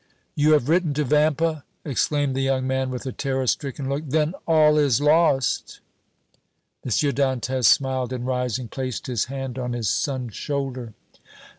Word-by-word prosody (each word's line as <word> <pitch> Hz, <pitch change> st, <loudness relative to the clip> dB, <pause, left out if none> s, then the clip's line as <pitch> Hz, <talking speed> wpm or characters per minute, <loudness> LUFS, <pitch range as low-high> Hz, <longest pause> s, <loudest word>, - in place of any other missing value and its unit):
"You 150 Hz, +1 st, +3 dB
have 145 Hz, -4 st, +2 dB
written 165 Hz, -2 st, +2 dB
to 150 Hz, -, +1 dB
Vampa!" 150 Hz, +2 st, +1 dB, 0.2 s
exclaimed 145 Hz, -1 st, 0 dB
the 135 Hz, -, 0 dB
young 135 Hz, -1 st, 0 dB
man, 130 Hz, 0 st, -1 dB
with 125 Hz, 0 st, -5 dB
a 130 Hz, -, -3 dB
terror 135 Hz, 0 st, -2 dB
stricken 135 Hz, +2 st, -2 dB
look. 140 Hz, +3 st, -2 dB
"Then 155 Hz, +3 st, +1 dB
all 155 Hz, -2 st, +5 dB
is 140 Hz, -4 st, +3 dB
lost!" 150 Hz, -3 st, +2 dB, 1.0 s
M. -, -, -5 dB
Dantès 130 Hz, -1 st, 0 dB
smiled, 130 Hz, 0 st, +3 dB
and, 125 Hz, -1 st, -4 dB
rising, 125 Hz, -1 st, -2 dB
placed 130 Hz, +1 st, -5 dB
his 120 Hz, -5 st, -1 dB
hand 135 Hz, -1 st, -5 dB
on 125 Hz, -1 st, -3 dB
his 115 Hz, -4 st, -1 dB
son's 130 Hz, -5 st, -2 dB
shoulder. 130 Hz, -5 st, -4 dB
135 Hz, 155 wpm, -23 LUFS, 130-150 Hz, 1.0 s, all